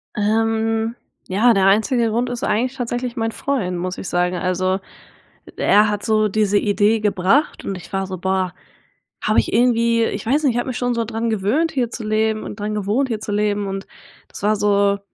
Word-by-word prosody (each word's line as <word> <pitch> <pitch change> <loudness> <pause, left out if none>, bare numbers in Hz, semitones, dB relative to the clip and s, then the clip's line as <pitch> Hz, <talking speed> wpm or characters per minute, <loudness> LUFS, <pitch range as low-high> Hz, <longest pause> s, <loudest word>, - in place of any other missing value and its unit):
Ähm, 225 +2 0 0.3
ja, 220 +6 +4
der 195 -2 +3
einzige 225 +3 +3
Grund 240 +3 0
ist 245 -1 -5
eigentlich 250 +4 0
tatsächlich 245 0 -3
mein 225 -2 -1
Freund, 215 -12 -2
muss 180 +1 -4
ich 190 - -6
sagen. 180 +1 0
Also 185 +1 0 0.7
e - - -13
er 210 +1 +4
hat 210 -1 -3
so 215 -1 +2
diese 205 0 +2
Idee 210 +2 +2
gebracht 210 +8 +1
und 195 - -3
ich 180 +1 -11
war 195 0 0
so: 185 -1 -5
Boah, 190 0 -1 0.7
hab - - +1
ich - - +2
irgendwie, 235 -1 +3
ich 200 - -4
weiß 285 +7 +1
nicht, 265 - +3
ich - - +1
hab - - -3
mich 250 - -3
schon 245 -1 0
so 230 -1 -1
dran 230 +1 -2
gewöhnt, 225 +11 +1
hier 250 -4 -1
zu 230 - -6
leben 215 0 0
und 210 - -8
dran 210 +1 -3
gewohnt, 210 +7 0
hier 220 -2 -2
zu 210 - -5
leben 205 -1 0
und 195 +1 -5 0.4
das - - -11
war 215 +1 +3
so 200 -1 +2
215 Hz, 205 wpm, -20 LUFS, 200-235 Hz, 0.7 s, ja